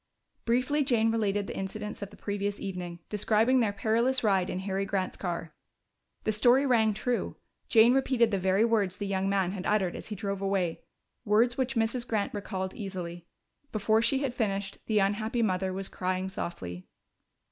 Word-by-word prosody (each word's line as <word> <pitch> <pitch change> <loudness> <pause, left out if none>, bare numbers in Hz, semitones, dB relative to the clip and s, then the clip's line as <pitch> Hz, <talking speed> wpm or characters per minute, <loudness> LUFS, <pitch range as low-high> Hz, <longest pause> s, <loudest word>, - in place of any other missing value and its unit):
Briefly 255 +5 +2
Jane 230 -4 +2
related 205 -3 0
the - - -6
incidents 210 +3 -5
of 200 - -5
the - - -15
previous 205 0 -3
evening, 180 -3 -5
describing 220 +4 +3
their 220 -4 +2
perilous 230 +6 +1
ride 195 -3 +2
in - - -3
Harry 195 0 -1
Grant's 190 -1 -2
car. 170 -3 -4 0.7
The 215 - +1
story 245 +6 +4
rang 220 -5 +3
true; 245 +3 -1 0.3
Jane 230 +1 +6
repeated 260 -4 +2
the 200 - +1
very 190 +4 +3
words 205 -5 +1
the 205 - -3
young 195 0 0
man 195 -2 +1
had 190 -1 -4
uttered 195 -4 +1
as - - -7
he 215 - -5
drove 200 -1 -3
away, 195 -4 0 0.4
words 230 +3 +3
which 265 0 -1
Mrs. 235 +2 0
Grant 210 -3 -1
recalled 190 -2 -4
easily. 175 -4 -6 0.4
Before 220 +1 +2
she 270 +4 +2
had 265 -3 -1
finished, 200 -4 -2
the 220 - +1
unhappy 215 +4 +1
mother 190 -2 0
was 190 +1 -4
crying 185 +1 -2
softly. 90 - -6
205 Hz, 175 wpm, -29 LUFS, 190-230 Hz, 0.7 s, Jane